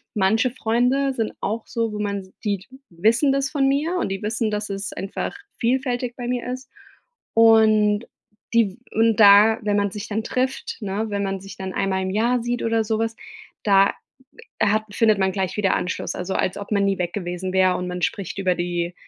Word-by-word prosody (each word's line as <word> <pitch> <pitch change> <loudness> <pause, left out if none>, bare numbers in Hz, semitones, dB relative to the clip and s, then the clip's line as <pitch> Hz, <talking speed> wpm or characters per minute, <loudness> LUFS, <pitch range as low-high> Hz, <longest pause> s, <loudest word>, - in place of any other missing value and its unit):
manche 220 +5 +2
Freunde 255 +3 +1
sind 225 -4 -2
auch 220 +2 -2
so, 230 -1 -2
wo 210 - -4
man 200 -2 -3
sieht, 200 -3 -2 0.2
wissen 225 - +3
das 275 0 0
von 275 -3 +2
mir. 295 +6 +1
Und, 355 - -1
die 195 0 -4
wissen, 220 +1 -1
dass 210 0 -3
es 195 -1 -4
einfach 195 - -4 0.2
vielfältig 245 0 -1
bei 245 -1 -5
mir 245 -1 -2
ist. 255 +1 -9 0.6
Und, 220 -1 +5 0.5
die 230 -4 +3
w 185 - -17 0.2
und 225 0 +3
da, 210 +2 +7
wenn 205 -1 +1
man 200 -1 +1
sich 210 +2 -6
dann 220 +1 -2
trifft, 255 +3 -2
ne, 205 +1 -2
wenn 200 -1 -2
man 195 0 -2
sich 195 0 -10
dann 190 -1 -5
einmal 190 -1 0
im 190 - -2
Jahr 235 +4 +1
sieht 240 0 -2
oder 225 -1 +1
sowas, 225 +1 -1 0.5
da 195 -1 +4 0.7
hat 215 +1 +3
findet 215 0 +3
man 190 0 +2
gleich 190 -1 -2
wieder 200 -3 +2
Anschluss. 180 - -3
Also, 180 +1 -4
als 185 - 0
ob 200 +1 -8
man 200 -1 +2
nie 195 -1 +1
weg 175 -1 -2
gewesen 180 -1 -4
wäre 185 -1 +3
und 180 - -4
man 180 0 -5
spricht 200 -4 -2
über 185 -2 +2
die 175 0 -2
210 Hz, 200 wpm, -22 LUFS, 195-230 Hz, 0.7 s, da